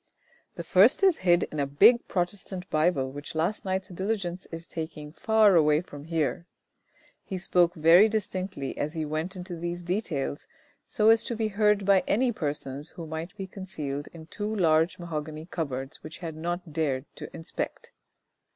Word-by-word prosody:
" - - -35
The - - -5
first - - +5
is 380 -4 +5
hid 175 -2 +3
in 155 - -4
a 140 - +1
big 235 - +5
Protestant 180 0 -3
Bible, 155 -4 +2
which 145 +3 -8
last 170 +8 -1
night's 190 0 -2
diligence 190 -1 -3
is 165 0 -7
taking 160 -3 -6
far 220 +3 +4
away 150 -2 +5
from 145 -5 -11
here." 165 +1 -1 0.8
He 190 - -5
spoke 175 -1 +2
very 170 +6 +7
distinctly 190 -8 -3
as 150 +2 -2
he 160 -2 -2
went 155 +5 -3
into 180 -1 -6
these 175 +1 -4
details, 170 -7 -2 0.4
so 215 +1 +3
as 225 -1 +5
to 235 - -2
be 220 -1 -1
heard 210 -1 +2
by 195 -1 +5
any 245 +4 +2
persons 145 - -3
who 165 - -8
might 160 +5 -6
be 195 - -4
concealed 155 -7 -6
in 160 -2 -11
two 210 +6 -4
large 160 -3 +3
mahogany 155 -2 -5
cupboards 135 -6 -5
which 155 - -9
he 180 - -8
had 160 -2 -5
not 170 0 -4
dared 145 -4 -1
to - - -7
inspect. 165 0 -5
170 Hz, 175 wpm, -27 LUFS, 155-190 Hz, 0.8 s, very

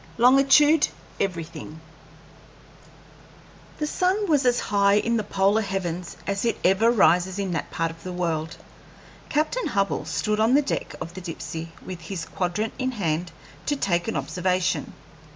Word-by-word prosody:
LONGITUDE 275 +5 +6 0.3
EVERYTHING 165 -4 -4 2.0
The 300 - -1
sun 370 +6 +1
was 290 -6 +3
as 245 0 +3
high 200 0 +3
in 230 +3 +2
the 215 - -1
polar 200 +2 +2
heavens 180 -3 -4
as 200 0 -1
it 235 - +1
ever 195 +5 +4
rises 190 -4 +3
in 195 -2 -2
that 165 - -3
part 165 0 -1
of 165 0 -14
the 185 - -6
world. 165 -2 -2 0.7
Captain 310 +12 0
Hubbell 195 -6 0
stood 210 +6 -1
on 225 +4 +4
the 295 - +4
deck 275 - -3
of 165 - -6
the 185 - -8
Dipsey 165 -1 -6 0.2
with 180 -2 -7
his 170 +1 -5
quadrant 190 +4 -2
in 260 0 -1
hand 170 -5 -1 0.4
to 290 - +2
take 175 -9 0
an - - -2
observation. 180 +6 -1
195 Hz, 150 wpm, -25 LUFS, 175-235 Hz, 2.0 s, LONGITUDE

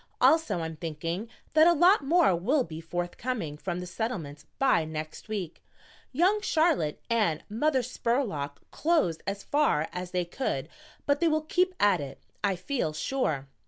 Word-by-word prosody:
"Also 310 - +4
I'm 160 -1 -5
thinking 165 +6 -4 0.2
that 315 +1 +7
a 345 - +6
lot 350 +2 +5
more 315 - +4
will 255 - +1
be 160 0 -8
forthcoming 175 +1 -3
from 175 +3 -4
the 180 - -5
Settlement 175 -6 -4
by 265 -12 +3
next 155 +5 -6
week. 195 -7 -5 0.5
Young 365 +10 +3
Charlotte 315 - +1
and 210 -10 +1
Mother 260 +4 +1
Spurlock 230 - -2
clothed 305 - +1
as 200 0 -3
far 285 - +1
as 180 0 -4
they 180 -1 -1
could, 165 - -3 0.4
but 285 0 +2
they 340 - +3
will 310 -1 +1
keep 365 +4 +1
at 200 -6 +4
it, 140 -1 -7 0.2
I 200 -2 +2
feel 185 - -2
sure. 155 - -1
205 Hz, 160 wpm, -28 LUFS, -, 0.5 s, that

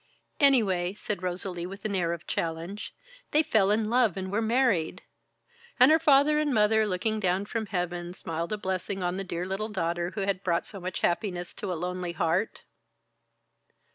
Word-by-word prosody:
"Anyway," 200 -10 +3
said 210 -2 -4
Rosalie, 180 -1 -3
with 195 +3 -10
an 210 - -1
air 175 -3 +1
of 170 -1 -5
challenge, 165 +5 -4 0.3
"they 305 +2 +3
fell 215 -8 +3
in 215 +1 +2
love 230 -4 +2
and 190 0 -4
were 210 +3 +1
married 225 -7 +1 0.4
" 475 - -29
"And 255 +4 +8
her 320 - +6
father 300 0 +5
and 300 -1 +1
mother, 220 -1 +3
looking 215 +3 -1
down 190 0 0
from 220 0 -3
heaven, 175 -1 -3
smiled 165 0 -4
a 215 - -1
blessing 190 -1 -3
on 180 +1 -1
the 195 - -2
dear 180 -1 -4
little 195 +4 -3
daughter 175 -3 -1
who 205 - -2
had 195 -1 -1
brought 170 -2 0
so 200 - -6
much 185 +1 -5
happiness 175 -1 -1
to - - -5
a - - -1
lonely 180 0 -3
heart?" 170 +5 0
195 Hz, 185 wpm, -28 LUFS, 175-220 Hz, 0.4 s, And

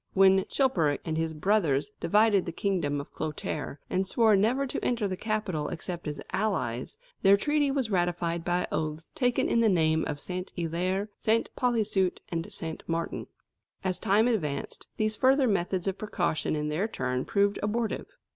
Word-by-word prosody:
When 190 0 +5
Chilperic 170 - +1
and 160 -2 -2
his 160 0 0
brothers 160 -1 +1
divided 210 -3 +3
the - - -2
kingdom 165 -6 -1
of 140 - -9
Clotaire, 150 -2 -4
and 190 +1 0
swore 220 -1 +4
never 235 +8 +2
to 255 - -4
enter 235 -4 +1
the 185 - -2
capital 195 -7 -2
except 175 0 -5
as 150 -1 -4
allies, 130 - -1 0.2
their 195 +1 +6
treaty 295 +5 +1
was 270 -5 -1
ratified 175 -2 0
by 175 +1 0
oaths 155 +1 -3
taken 250 -5 +1
in 235 - +2
the 230 -1 +4
name 160 -3 +3
of 145 -2 -3
Saint 180 +3 -4
Hilaire, 180 +4 -1
Saint 225 +1 +1
Policeute, 215 -7 +1
and 165 -1 -3
Saint 160 -1 -5
Martin. 165 0 -2 0.6
As 185 -1 0
time 210 +4 +3
advanced, 155 - -2
these 215 0 +1
further 265 +3 +4
methods 185 -3 0
of 195 0 -2
precaution 160 -7 -1
in 150 0 -2
their 170 +8 0
turn 130 - -2
proved 200 0 +1
abortive. 220 +2 -1
190 Hz, 165 wpm, -28 LUFS, 160-215 Hz, 0.6 s, their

